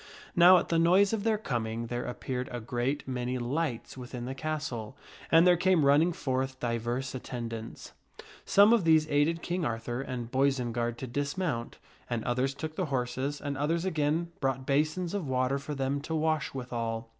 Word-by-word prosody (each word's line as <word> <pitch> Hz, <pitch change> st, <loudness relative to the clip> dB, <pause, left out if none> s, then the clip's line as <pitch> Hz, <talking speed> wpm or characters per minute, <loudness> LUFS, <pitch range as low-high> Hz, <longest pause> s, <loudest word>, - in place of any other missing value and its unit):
Now 180 Hz, +2 st, +8 dB
at -, -, -1 dB
the 165 Hz, -, +2 dB
noise 185 Hz, +5 st, +4 dB
of 215 Hz, -3 st, -1 dB
their 220 Hz, -1 st, +2 dB
coming, 115 Hz, -, -3 dB
there 120 Hz, +1 st, -3 dB
appeared 125 Hz, +1 st, -4 dB
a 120 Hz, -, -4 dB
great 120 Hz, +5 st, -2 dB
many 125 Hz, -1 st, -2 dB
lights 130 Hz, +1 st, -2 dB
within 125 Hz, -1 st, -7 dB
the 130 Hz, -, -4 dB
castle, 135 Hz, -5 st, -4 dB, 0.3 s
and 165 Hz, +1 st, +7 dB
there 180 Hz, -1 st, +6 dB
came 175 Hz, -3 st, +3 dB
running 150 Hz, +5 st, +5 dB
forth 130 Hz, -3 st, -2 dB
divers 120 Hz, +2 st, -2 dB
attendants. 115 Hz, -3 st, -6 dB, 0.5 s
Some 205 Hz, +3 st, +6 dB
of 230 Hz, -5 st, +3 dB
these 160 Hz, -1 st, +4 dB
aided 155 Hz, +4 st, +2 dB
King 175 Hz, 0 st, -2 dB
Arthur 120 Hz, -1 st, -2 dB
and 125 Hz, -3 st, -5 dB
Boisenard 120 Hz, -3 st, 0 dB
to -, -, -5 dB
dismount, 140 Hz, 0 st, -2 dB, 0.3 s
and 120 Hz, -2 st, -2 dB
others 130 Hz, +3 st, 0 dB
took 155 Hz, +2 st, -5 dB
the 185 Hz, -, 0 dB
horses, 130 Hz, +1 st, -2 dB
and 145 Hz, -1 st, -3 dB
others 165 Hz, +5 st, 0 dB
again 165 Hz, 0 st, 0 dB
brought 135 Hz, -1 st, -1 dB
basins 155 Hz, +6 st, 0 dB
fndlfs^irt -, -, +1 dB
of 165 Hz, -, -6 dB
water 130 Hz, +1 st, +1 dB
for 145 Hz, +2 st, -5 dB
them 135 Hz, +1 st, -1 dB
to 160 Hz, +2 st, -3 dB
wash 155 Hz, -3 st, 0 dB
withal. 115 Hz, -3 st, -4 dB
135 Hz, 180 wpm, -29 LUFS, 125-160 Hz, 0.5 s, Now